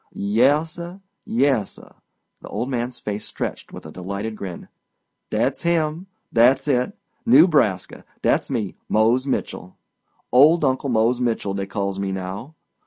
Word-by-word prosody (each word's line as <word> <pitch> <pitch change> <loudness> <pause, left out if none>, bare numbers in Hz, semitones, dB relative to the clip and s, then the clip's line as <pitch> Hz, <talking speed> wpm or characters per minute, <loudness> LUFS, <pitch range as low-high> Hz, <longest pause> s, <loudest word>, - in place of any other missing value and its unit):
"Yassir, 150 - +1 0.3
yassir,"—the 140 - -3
old 125 +3 -3
man's 125 0 -2
face 105 0 -5
stretched - - -5
with - - -10
a 80 - -9
delighted 100 +5 -5
grin—"dat's 95 -4 -5
him, 170 +1 0 0.3
dat's 125 +5 +4
it. 130 +7 0 0.3
Newbraska. 150 - +4 0.2
Dat's - - +2
me—Mose 115 +5 0
Mitchell. 90 -8 -4 0.5
Old 150 +5 +6
Uncle 130 +1 0
Mose 120 +1 +2
Mitchell, 115 -5 -1
dey 95 0 -3
calls 100 -1 -3
me 100 -1 -2
now. 95 +10 -6
120 Hz, 115 wpm, -22 LUFS, 100-145 Hz, 0.5 s, Old